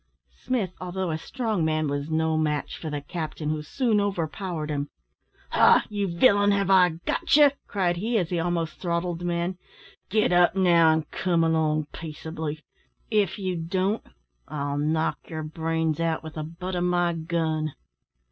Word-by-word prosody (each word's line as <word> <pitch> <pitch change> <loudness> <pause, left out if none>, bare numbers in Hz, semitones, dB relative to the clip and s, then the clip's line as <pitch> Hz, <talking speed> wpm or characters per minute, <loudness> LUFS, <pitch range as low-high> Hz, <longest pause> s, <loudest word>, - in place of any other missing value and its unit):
Smith, 220 -8 -1
although 185 -1 -2
a 155 - -1
strong 220 -4 -2
man, 155 -1 +1
was 145 +1 -3
no 160 0 +1
match 150 -2 -1
for 160 - -6
the 145 -1 -3
captain, 155 0 -4
who 155 -1 -2
soon 215 - +1
overpowered 175 -4 -3
him. 145 0 -2 0.6
"Ha! - - +5
you 205 -1 -1
villain, 205 +3 +4
have 200 -1 +2
I 180 -4 +5
got - - +2
you?" 295 -2 +7 0.2
cried 180 -3 0
he, 225 +5 0
as 180 -4 -1
he 175 - 0
almost 165 -1 -2
throttled 170 -1 -1
the 175 - -5
man. 175 +1 -1 0.5
"Get 215 -1 +2
up 175 +1 +4
now, 170 -4 +5
an' 160 -1 +1
come 175 -3 +1
along 155 -2 +1
peaceably. 160 -1 -6 0.5
If 205 -4 +2
you 185 -3 -2
don't, 185 +5 -1 0.5
I'll 145 -1 -3
knock 155 +2 0
your 160 -1 -4
brains 160 0 -1
out 165 -1 0
with 160 -1 -8
the 155 - -4
butt 175 +4 -6
of 175 0 0
my 175 -1 +2
gun." 160 -2 -1
170 Hz, 165 wpm, -26 LUFS, 155-185 Hz, 0.6 s, you